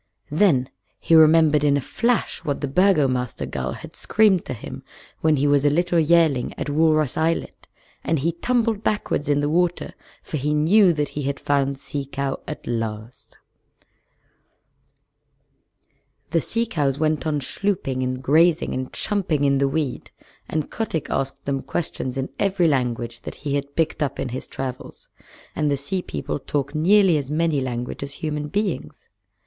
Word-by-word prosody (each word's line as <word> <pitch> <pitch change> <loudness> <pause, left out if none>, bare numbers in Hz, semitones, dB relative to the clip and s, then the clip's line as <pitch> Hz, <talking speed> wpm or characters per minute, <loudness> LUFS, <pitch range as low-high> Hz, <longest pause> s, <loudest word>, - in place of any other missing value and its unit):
Then 150 -6 +3 0.3
he - - 0
remembered 155 -2 +6
in 145 -1 +4
a - - +1
flash 235 - -1
what 145 -4 -2
the 145 - -1
Burgomaster 135 - +2
gull 65 0 -4
had - - -11
screamed 205 -5 +3
to 130 - -4
him 105 - -8 0.4
when 155 -1 +3
he 140 0 +1
was 145 -1 +3
a 145 - +5
little 175 +3 +2
yearling 160 -5 +3
at 145 - -3
Walrus 155 -2 +2
Islet, 160 +1 -1 0.4
and 165 - +1
he 155 +5 0
tumbled 225 +4 0
backward 205 -9 -1
in 145 0 +3
the 145 - 0
water, 175 +3 0 0.3
for 155 - -4
he 150 +2 0
knew 180 +6 +5
that 150 -3 -1
he 150 - -5
had 140 0 -2
found 140 -1 0
Sea 140 +1 -5
Cow 135 0 -3
at 150 - -7
last. 115 +1 -5 2.9
The 165 - +2
sea 230 +7 0
cows 145 - -1
went 155 -2 0
on 150 -1 0
schlooping 135 -4 -2
and 130 0 -3
grazing 160 +4 +3
and 130 0 -4
chumping 185 -9 -1
in 140 -1 +3
the 140 - +3
weed, 140 -3 -3 0.4
and 155 -2 -2
Kotick 195 -9 -3
asked 135 +1 -2
them 135 -1 -1
questions 130 -6 -3
in 135 0 -2
every 195 -3 +2
language 120 -4 -1
that - - -7
he 145 -1 -4
had 140 0 -3
picked 160 -1 0
up 145 - -1
in 125 - -2
his 130 +2 -5
travels; 130 -1 -7 0.5
and 150 -1 +1
the 140 - +1
Sea 180 +7 -2
People - - -4
talk 145 0 -3
nearly 180 +2 +4
as 140 -2 -4
many 155 -1 +1
languages 125 +2 -4
as - - -6
human 150 -1 -3
beings. 200 +2 -3
150 Hz, 165 wpm, -23 LUFS, 135-165 Hz, 2.9 s, remembered